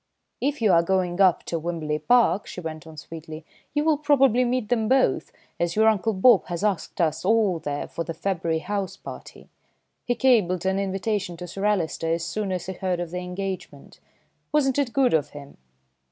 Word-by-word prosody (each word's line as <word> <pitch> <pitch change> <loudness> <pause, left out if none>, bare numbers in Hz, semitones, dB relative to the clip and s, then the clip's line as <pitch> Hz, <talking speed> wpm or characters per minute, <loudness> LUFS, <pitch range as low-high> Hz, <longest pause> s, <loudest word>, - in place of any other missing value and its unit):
"If 280 -2 -1
you 210 - +5
are 170 - +6
going 180 +1 0
up 185 -3 +4
to 165 - -3
Wimberley 155 -2 -3
Park," 235 +2 +3
she - - -7
went 160 -2 -7
on 160 -1 -12
sweetly, 155 +1 -9 0.3
"you 295 - +2
will 310 -2 +2
probably 270 -5 +4
meet 250 -3 -1
them 225 -3 +1
both, 265 0 +2 0.3
as 170 0 -1
your 220 +1 +4
Uncle 220 0 +2
Bob 205 +2 +5
has 175 +1 -4
asked 195 -5 -1
us 160 -2 0
all 205 -3 +2
there 145 -2 -4
for 170 - -4
the 165 0 -6
February 170 -2 -1
house 200 0 -3
party. - - -11 0.6
He 245 - 0
cabled 210 -9 +2
an 190 +1 +1
invitation 195 -2 -2
to 180 +1 -7
Sir 195 +4 -4
Alister 165 -5 0
as 165 0 -1
soon 210 -3 -3
as 180 -2 -3
he 190 - -4
heard 180 -1 -2
of 175 -2 -4
the 180 - -3
engagement. 185 +1 -6 0.5
Wasn't 285 -2 +2
it 270 -4 0
good 265 -1 +2
of 155 -3 +1
him?" 140 -1 -12
190 Hz, 195 wpm, -24 LUFS, 170-225 Hz, 0.6 s, are